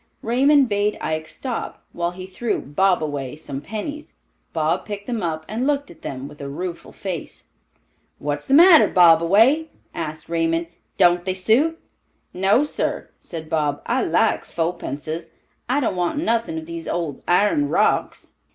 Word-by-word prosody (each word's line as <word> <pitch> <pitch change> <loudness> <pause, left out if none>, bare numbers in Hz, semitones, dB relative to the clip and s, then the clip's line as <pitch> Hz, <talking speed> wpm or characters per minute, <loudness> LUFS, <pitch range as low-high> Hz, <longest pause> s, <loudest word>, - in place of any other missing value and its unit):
Raymond 270 +4 +4
bade 205 -1 0
Ike 155 0 -3
stop, 250 +5 -5
while 170 0 -1
he 185 +1 -8
threw 200 +5 -2
"Bobaway" 145 -4 0
some 140 -3 -6
pennies. 220 - -6 0.4
Bob 155 0 0
picked 205 -1 -6
them 235 -3 -3
up 160 -2 -3
and 235 +5 -2
looked 285 -1 0
at 160 - -17
them 135 0 -6
with 145 +1 -13
a 140 - -5
rueful 170 +4 -6
face. 185 -5 -7 0.7
"What's 145 0 -4
the 270 - +4
matter, 340 0 +8
Bobaway?" 190 - +5 0.3
asked 155 -2 -5
Raymond. 165 0 0 0.3
"Don't 175 -1 +4
they 185 0 -2
suit?" 265 - +2 0.5
"No, 195 +8 +3
sir," 295 - -3
said 160 -2 -7
Bob. 150 -3 -1
"I - - +1
like - - +2
fopences; 165 -1 -4 0.4
I 265 +3 +2
don't 250 - 0
want 175 +7 -1
nothin' 230 - 0
of 160 - -5
these 170 0 -7
old 165 -5 -3
iron 210 - +3
rocks." - - 0
180 Hz, 150 wpm, -22 LUFS, 160-230 Hz, 0.7 s, matter